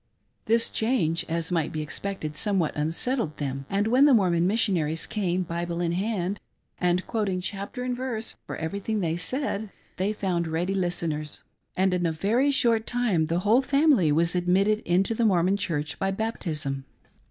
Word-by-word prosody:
This 230 Hz, +1 st, +3 dB
^hange, 195 Hz, -9 st, +1 dB
as 165 Hz, +1 st, -2 dB
might 165 Hz, -3 st, 0 dB
be 155 Hz, -1 st, -3 dB
expected, 155 Hz, -1 st, -5 dB
somewhat 190 Hz, -2 st, 0 dB
unsettled 165 Hz, -, -1 dB
them, 135 Hz, -1 st, -4 dB
and 200 Hz, +1 st, +1 dB
when 250 Hz, +5 st, +5 dB
the 285 Hz, -4 st, +6 dB
Mormon 175 Hz, -4 st, +3 dB
Missionaries 175 Hz, -7 st, +1 dB
came, 185 Hz, -3 st, -1 dB
Bible 170 Hz, 0 st, -3 dB
in 170 Hz, -1 st, 0 dB
hand, 195 Hz, +1 st, -1 dB, 0.4 s
and 180 Hz, +1 st, +1 dB
quoting 205 Hz, -5 st, -1 dB
chapter 200 Hz, +6 st, -4 dB
and 250 Hz, 0 st, -1 dB
verse 245 Hz, -3 st, -4 dB
for -, -, -4 dB
everything 200 Hz, +6 st, -3 dB
they 165 Hz, -2 st, 0 dB
said, 220 Hz, +2 st, -3 dB, 0.3 s
they 190 Hz, +3 st, 0 dB
found 185 Hz, -5 st, -1 dB
ready 170 Hz, +4 st, -1 dB
listeners; 170 Hz, -5 st, -2 dB, 0.3 s
and 190 Hz, 0 st, +3 dB
in 175 Hz, -1 st, +1 dB
a -, -, 0 dB
very 220 Hz, -, +1 dB
short 230 Hz, -5 st, +3 dB
time 220 Hz, -10 st, +1 dB
the 170 Hz, +2 st, 0 dB
whole 220 Hz, +6 st, +4 dB
family 275 Hz, -, +3 dB
was 170 Hz, +3 st, +2 dB
admitted 190 Hz, +4 st, +2 dB
into 185 Hz, +5 st, +2 dB
the 230 Hz, -, 0 dB
Mormon 190 Hz, -2 st, +3 dB
Church 150 Hz, -7 st, -3 dB
by 195 Hz, -, 0 dB
baptism. 165 Hz, -10 st, -3 dB
185 Hz, 165 wpm, -26 LUFS, 165-220 Hz, 0.4 s, the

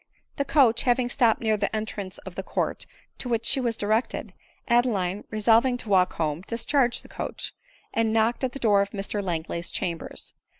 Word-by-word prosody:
The 280 Hz, -, 0 dB
coach 255 Hz, -6 st, +4 dB
having 245 Hz, 0 st, +2 dB
stopped 240 Hz, -3 st, +3 dB
near 220 Hz, -2 st, +2 dB
the 200 Hz, +2 st, -1 dB
entrance 205 Hz, -3 st, -4 dB
of -, -, -10 dB
the -, -, -4 dB
court -, -, -2 dB, 0.3 s
to 250 Hz, -, -4 dB
which 230 Hz, -1 st, 0 dB
she 270 Hz, -, +4 dB
was 235 Hz, -3 st, -1 dB
directed, 215 Hz, +4 st, -1 dB, 0.3 s
Adeline, 210 Hz, -6 st, +1 dB
resolving 230 Hz, +4 st, +3 dB
to 230 Hz, -, -2 dB
walk 185 Hz, -2 st, +4 dB
home, 155 Hz, 0 st, -1 dB
discharged 240 Hz, +2 st, +1 dB
the -, -, -13 dB
coach, -, -, -5 dB, 0.4 s
and 225 Hz, -1 st, +2 dB
knocked 225 Hz, +3 st, +2 dB
at 255 Hz, -2 st, 0 dB
the -, -, -5 dB
door 210 Hz, -6 st, +4 dB
of 200 Hz, -, -1 dB
Mr 205 Hz, +1 st, -3 dB
Langley's 170 Hz, -1 st, -3 dB
chambers. 170 Hz, -2 st, -4 dB
220 Hz, 180 wpm, -26 LUFS, 200-240 Hz, 0.4 s, coach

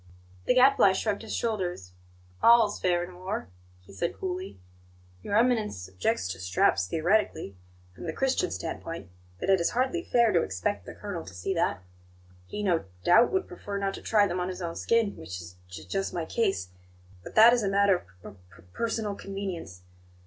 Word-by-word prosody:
The -, -, +3 dB
Gadfly 255 Hz, -6 st, +6 dB
shrugged 205 Hz, +1 st, -1 dB
his 225 Hz, -, -5 dB
shoulders. 180 Hz, -, -2 dB, 0.5 s
"All's 230 Hz, -3 st, +5 dB
fair 175 Hz, -1 st, +2 dB
in 180 Hz, +1 st, -8 dB
war," 190 Hz, -, -4 dB, 0.3 s
he 90 Hz, -, -16 dB
said 170 Hz, -, -3 dB
coolly. 370 Hz, 0 st, -5 dB, 0.6 s
"Your 200 Hz, -, 0 dB
Eminence 220 Hz, -, +1 dB
objects 95 Hz, 0 st, -1 dB
to 95 Hz, +1 st, -5 dB
straps 90 Hz, 0 st, +2 dB
theoretically, 165 Hz, -, 0 dB, 0.4 s
from -, -, -10 dB
the 165 Hz, -, -2 dB
Christian 270 Hz, -, 0 dB
standpoint; 165 Hz, -, -6 dB, 0.3 s
but 195 Hz, -, +1 dB
it 190 Hz, -, +5 dB
is 170 Hz, -, +2 dB
hardly 260 Hz, +8 st, 0 dB
fair 235 Hz, -8 st, +3 dB
to 170 Hz, -, +4 dB
expect 95 Hz, 0 st, -3 dB
the -, -, -8 dB
colonel 200 Hz, -5 st, -6 dB
to 95 Hz, -, -12 dB
see 90 Hz, -, -2 dB
that. 165 Hz, -, 0 dB, 0.6 s
He, 210 Hz, -, -5 dB
no 175 Hz, -, +1 dB, 0.2 s
doubt, 205 Hz, +7 st, +5 dB
would 380 Hz, 0 st, 0 dB
prefer 205 Hz, -, -6 dB
not 195 Hz, -1 st, -1 dB
to -, -, -8 dB
try 210 Hz, -2 st, +3 dB
them 180 Hz, -2 st, -2 dB
on 180 Hz, +1 st, -2 dB
his 185 Hz, -1 st, -6 dB
own 170 Hz, -2 st, -4 dB
skin 230 Hz, -3 st, +1 dB
which 90 Hz, +3 st, -7 dB
is 85 Hz, 0 st, -11 dB
j 85 Hz, -3 st, -9 dB
j -, -, -18 dB
just 195 Hz, -1 st, -2 dB
my 170 Hz, -2 st, -2 dB
case. 195 Hz, -, -1 dB, 0.5 s
But -, -, -10 dB
that 225 Hz, +2 st, +9 dB
is 245 Hz, -, +2 dB
a 200 Hz, -, 0 dB
matter 195 Hz, -, +2 dB, 0.2 s
of -, -, -10 dB
p -, -, -23 dB, 0.2 s
p 85 Hz, -, -17 dB
personal 225 Hz, -3 st, -2 dB
convenience. 195 Hz, -, -6 dB
195 Hz, 190 wpm, -28 LUFS, 140-220 Hz, 0.6 s, that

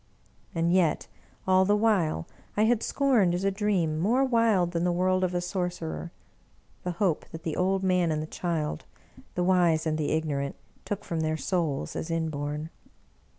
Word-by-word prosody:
And 165 Hz, +1 st, +2 dB
yet, 175 Hz, -5 st, +2 dB, 0.4 s
all 185 Hz, 0 st, +5 dB
the 205 Hz, +2 st, +3 dB
while, 190 Hz, -, +1 dB, 0.3 s
I 210 Hz, -, +4 dB
had 230 Hz, 0 st, +3 dB
scorned, 235 Hz, -11 st, +2 dB
as 180 Hz, -, -2 dB
a 195 Hz, -, +2 dB
dream, 190 Hz, -6 st, 0 dB
more 240 Hz, +10 st, +3 dB
wild 225 Hz, -8 st, +3 dB
than 170 Hz, -1 st, -1 dB
the 180 Hz, -, +2 dB
word 185 Hz, +1 st, +1 dB
of 180 Hz, -1 st, 0 dB
a 175 Hz, -, +1 dB
sorcerer, 175 Hz, -, -3 dB, 0.7 s
the 180 Hz, -, -3 dB
hope 175 Hz, -3 st, 0 dB
that 165 Hz, -1 st, -9 dB
the. 160 Hz, -, -2 dB
old 190 Hz, +1 st, +1 dB
man 180 Hz, -3 st, +2 dB
and 155 Hz, -, 0 dB
the 155 Hz, -, -3 dB
child, 155 Hz, -, -3 dB, 0.5 s
the 180 Hz, -, +1 dB
wise 175 Hz, -3 st, +3 dB
and 155 Hz, -1 st, 0 dB
the 150 Hz, -, 0 dB
ignorant, 145 Hz, -3 st, -1 dB, 0.3 s
took 205 Hz, -1 st, -3 dB
from 165 Hz, -, -2 dB
their 155 Hz, 0 st, 0 dB
souls 150 Hz, -, -1 dB
as 165 Hz, -, -4 dB
inborn. 155 Hz, -1 st, -2 dB
175 Hz, 175 wpm, -27 LUFS, 155-190 Hz, 0.7 s, all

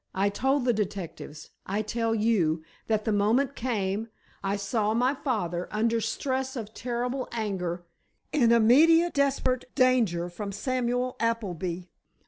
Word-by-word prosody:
I 195 Hz, +2 st, +2 dB
told 265 Hz, +6 st, 0 dB
the 245 Hz, -, +3 dB
detectives—I 195 Hz, -1 st, -5 dB
tell 225 Hz, +1 st, -1 dB
you, 185 Hz, -8 st, +1 dB, 0.2 s
that 215 Hz, -1 st, 0 dB
the 220 Hz, -, +1 dB
moment 230 Hz, +7 st, +2 dB
came—I 205 Hz, -3 st, -3 dB
saw 210 Hz, +1 st, 0 dB
my 250 Hz, +3 st, +2 dB
father, 180 Hz, -, -2 dB
under 225 Hz, +2 st, +1 dB
stress 265 Hz, +4 st, -2 dB
of 220 Hz, -3 st, -6 dB
terrible 250 Hz, +2 st, -3 dB
anger—in 190 Hz, -, -2 dB
immediate, 315 Hz, +10 st, +5 dB
desperate 270 Hz, -3 st, +1 dB
danger 235 Hz, -10 st, +3 dB
from 200 Hz, +3 st, -6 dB
Samuel 250 Hz, +3 st, -1 dB
Appleby. 185 Hz, -7 st, -2 dB
225 Hz, 115 wpm, -27 LUFS, 200-255 Hz, 0.2 s, immediate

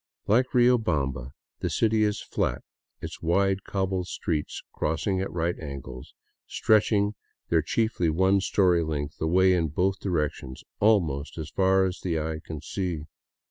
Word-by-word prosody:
Like 120 Hz, +5 st, +3 dB
Riobamba, 80 Hz, -, +2 dB, 0.3 s
the -, -, -2 dB
city 110 Hz, -1 st, +2 dB
is 105 Hz, 0 st, 0 dB
flat, -, -, -2 dB, 0.4 s
its -, -, -7 dB
wide, 95 Hz, +3 st, +1 dB
cobbled 95 Hz, -2 st, -2 dB
streets, 80 Hz, -5 st, -3 dB
crossing 95 Hz, +5 st, -1 dB
at 95 Hz, -, -3 dB
right 85 Hz, +1 st, -1 dB
angles, 70 Hz, -3 st, -8 dB, 0.3 s
stretching 105 Hz, -1 st, +2 dB, 0.4 s
their 80 Hz, -1 st, +3 dB
chiefly 100 Hz, 0 st, 0 dB
one 95 Hz, +4 st, +3 dB
story 90 Hz, -3 st, +3 dB
length 75 Hz, -2 st, -4 dB
away 95 Hz, +4 st, +4 dB
in 85 Hz, -3 st, +1 dB
both 95 Hz, +6 st, 0 dB
directions 75 Hz, -7 st, -3 dB, 0.2 s
almost 85 Hz, -11 st, +2 dB
as 80 Hz, -1 st, -6 dB
far 95 Hz, +1 st, +3 dB
as 95 Hz, 0 st, -3 dB
the 85 Hz, -3 st, -1 dB
eye 80 Hz, 0 st, -3 dB
can 80 Hz, -3 st, -7 dB
see. 90 Hz, -2 st, -3 dB
90 Hz, 140 wpm, -26 LUFS, 80-100 Hz, 0.4 s, away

